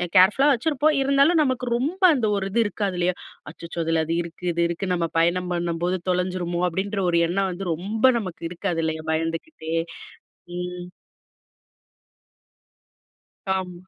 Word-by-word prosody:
கேர்ஃபுல்லா 200 +10 +6
வச்சுருப்போம் 295 +3 +2
இருந்தாலும், 280 +5 +4
நமக்கு 255 -2 -1
ரொம்ப 310 +10 -3
அந்த 245 -5 0
ஒரு 195 -1 -1
இது 235 - +1
இருக்காது 205 -2 -2
இல்லையா? 180 +1 +1 0.4
அச்சச்சோ! 170 0 -8
அதில 165 0 +1
அது 165 - -2
இருக்கு, 170 +1 -10
இது 170 0 -1
இருக்கு 170 +3 -3
நம்ம 170 -2 0
பயணம் 180 +2 +1
பண்ணும்போது 175 +1 -1
தொலைஞ்சிருமோ! 180 -1 -1
அப்டின்ற 195 +4 -2
ஒரு 170 -1 +3
எண்ணம் 190 +2 0
வந்து 185 +2 -6
ரொம்ப 215 +9 +2
நமக்கு 185 -6 -7
இருக்காது 175 -1 -2
இல்லையா? 160 0 -3
பயந்துக்கிட்டே. 165 - -3 0.8
ம். 180 0 -5 2.7
ஆமா. 180 -2 -5
180 Hz, 135 wpm, -24 LUFS, 170-215 Hz, 2.7 s, கேர்ஃபுல்லா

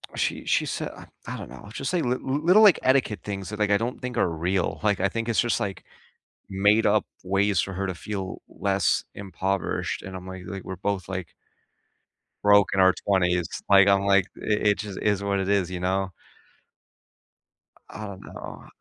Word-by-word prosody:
She - - -1
she - - +2
said - - -3
I - - -12 0.2
I - - -4
don't - - -8
know, 65 - -11
it's 105 - -12
just, 135 - -2
like, 175 - +1
li 125 +1 +1
li 135 +2 -2
little, 185 +6 +6
like, 200 -5 +7
etiquette 130 -5 +2
things, 100 -2 -5
that, 105 - -6
like, 105 -1 +2
I 100 - +4
don't 115 +4 -3
think 125 -2 -5
are - - +2
real. 85 +3 -1
Like, 105 -3 +1
I 100 - +2
think 115 +3 -3
it's 115 - +2
just, 120 -1 0
like, 100 -4 -4 0.6
made-up 105 +2 +3 0.2
ways 100 0 +1
for 95 - -1
her 95 +1 -2
to 95 - -3
feel 95 0 -5
less 95 -5 0
impoverished, 95 -1 -2
and 95 0 -7
I'm, 90 0 -8
like 95 -1 -8
like, 95 -2 -6
we're 95 - -6
both, 95 0 -3
like 95 -3 -4 1.1
broke 100 -1 +6
in 100 - +1
our 95 0 +6
20s. 90 -4 +2 0.2
Like, 100 0 +7
I'm, 100 0 +4
like 100 -2 +4
i - - -12
it 105 -1 +2
just 105 -3 -6
is 105 -1 +1
what 100 -1 0
it 95 0 -2
is, 100 -3 +2
you 90 - -4
know? 95 +1 -1 1.8
I 105 +2 -7
don't 100 -2 -9
know. - - -9
100 Hz, 200 wpm, -25 LUFS, 95-105 Hz, 1.8 s, like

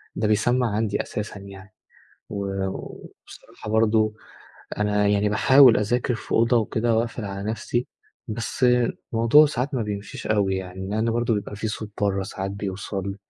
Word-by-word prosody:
ده 105 - 0
بيسمَّع 120 +4 +2
عندي 110 -1 0
أساسًا 105 -1 -6
يعني. 100 +1 -12 0.6
و 100 -1 -3
وبصراحة، 105 +2 -10
برضه 110 -1 +2 0.6
أنا 105 0 +1
يعني 105 0 +2
باحاول 130 +3 +6
أذاكر 120 +3 0
في - - -7
أوضة 115 +1 +3
وكده، 115 +1 +1
وأقفل 115 -1 -2
على 100 +1 -4
نفسي، 120 +2 -2 0.4
بس 115 +3 -2 0.5
الموضوع 115 +7 +6
ساعات 135 0 -2
ما 120 - 0
بيمشيش 100 -1 -6
أوي 100 -3 +1
يعني، 95 +1 -6
لأن 110 +2 0
برضه 120 0 +1
بيبقى 105 0 -4
في 110 +1 -3
صوت 110 -1 -5
برّه 100 -1 +1
ساعات 95 0 -5
بيوصل. 100 0 -4
105 Hz, 150 wpm, -24 LUFS, 100-115 Hz, 0.6 s, باحاول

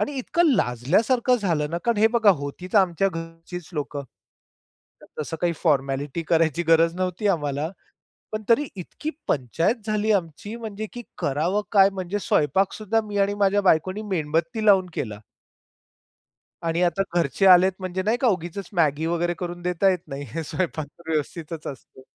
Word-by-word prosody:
आणि 290 - -1
इतकं 335 +6 +2
लाजल्यासारखं 215 - +2
झालं 165 -9 -1
ना 170 - -1
कारण 235 -1 +2
हे 220 - +6
बघा 220 -3 +6
होतीच 145 +7 -7
आमच्या 190 -1 +3
घरचीच 165 0 -8
लोकं. 145 -1 -3 1.2
तसं 165 +2 -4
काही 175 -1 +1
फॉरमॅलिटी 140 0 0
करायची 165 -1 +2
गरज 165 +1 +5
नव्हती 185 +2 -2
आम्हाला. 150 -2 -1 0.6
पण 215 0 -4
तरी 275 +5 +4
इतकी 200 - -6 0.2
पंचायत 155 - +1
झाली 215 0 +1
आमची 180 +5 -7
म्हणजे, 220 -2 -5
की 240 -1 -7
करावं 165 +9 0
काय? 195 -2 +6
म्हणजे 190 +1 -4
स्वयंपाक 190 +2 +1
सुद्धा 220 +1 0
मी 205 -1 -4
आणि 200 +1 +2
माझ्या 200 +1 +3
बायकोनी 185 +2 +2
मेणबत्ती 190 +4 -1
लावून 195 -3 +6
केला. 105 -7 -4 1.4
आणि 165 +1 0
आता 180 +3 +1 0.2
घरचे 170 +3 +1
आलेत 185 0 +7
म्हणजे 185 0 -3
नाही 220 +4 +1
का? 260 - +4
उगीचच 185 -1 -2
मॅगी 155 -3 +2
वगैरे 170 +1 0
करून 175 -1 -5
देता 180 +2 +2
येत 180 -3 -2
नाही. 140 -1 -6
हे 165 - -3
स्वयंपाक 160 -1 -2
तर 165 -1 -11
व्यवस्थितच 155 +1 -3
असतो. 130 -1 -10
175 Hz, 155 wpm, -24 LUFS, 160-205 Hz, 1.4 s, आलेत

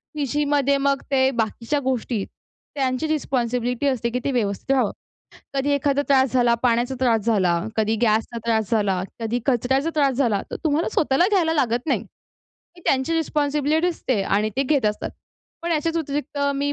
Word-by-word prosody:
पीजीमध्ये 285 -1 +1
मग 275 0 +1
ते 265 -1 +4
बाकीच्या 230 +3 -1
गोष्टी 250 -5 -1 0.5
त्यांची 265 +2 0
रिस्पॉन्सिबिलिटी 250 -3 -1
असते, 240 -4 0
की 250 +2 -2
ते 280 - +1
व्यवस्थित 220 0 -1
व्हावं. 255 -6 +2 0.6
कधी 275 +1 +1
एखादा 285 0 +1
त्रास 265 -2 +3
झाला, 240 -2 +3
पाण्याचा 245 +2 +2
त्रास 235 -4 +3
झाला, 185 -6 +2 0.2
कधी 220 0 +1
गॅसचा 225 +1 +1
त्रास 220 -4 +1
झाला, 200 -5 +1 0.2
कधी 230 +2 -1
कचऱ्याचा 265 +4 +1
त्रास 280 -3 +2
झाला 230 -7 +1
तर - - -3
तुम्हाला 310 +2 +1
स्वतःला 300 +4 +3
घ्यायला 350 -6 +2
लागत 245 -3 0
नाही. - - +1 0.7
ती - - -14
त्यांची 265 +4 +1
रिस्पॉन्सिबिलिटी 300 0 +1
असते 260 - -1
आणि 210 +2 +1
ते 270 - +3
घेत 275 -2 +1
असतात. 210 0 -2 0.5
पण 340 0 -1
याच्याच 325 +2 0
व्यतिरिक्त 290 -2 -3 0.2
मी 285 +1 0
265 Hz, 160 wpm, -23 LUFS, 235-285 Hz, 0.7 s, ते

